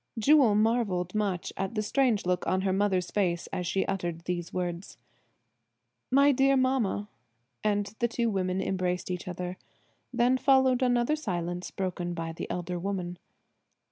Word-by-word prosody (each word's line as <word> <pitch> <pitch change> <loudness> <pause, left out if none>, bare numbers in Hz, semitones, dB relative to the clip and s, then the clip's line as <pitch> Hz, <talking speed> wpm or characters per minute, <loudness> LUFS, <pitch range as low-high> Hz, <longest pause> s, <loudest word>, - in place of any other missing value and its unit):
Jewel 255 -2 +5
marvelled 210 -5 +1
much 200 -5 -1
at 195 +4 -3
the 215 - 0
strange 240 -3 +1
look 180 0 0
on 185 0 +1
her 190 -1 +1
mother's 190 -2 +1
face 175 -4 0
as 180 -1 -2
she 190 +2 0
uttered 175 -4 -3
these 175 0 -4
words. 175 0 -4 1.1
"My 280 +2 +5
dear 270 +1 +3
mamma!" 255 -6 +1 0.6
and 205 -1 +1
the 235 - +2
two 235 0 -1
women 190 -3 0
embraced 180 -1 -1
each 180 0 -4
other. 180 0 -5 0.5
Then 250 +1 +2
followed 265 -2 +4
another 245 +3 +2
silence 175 - -3
broken 175 -2 -3
by 165 -1 -4
the 165 - -6
elder 180 0 -3
woman. 180 -2 -4
195 Hz, 150 wpm, -28 LUFS, 180-235 Hz, 1.1 s, Jewel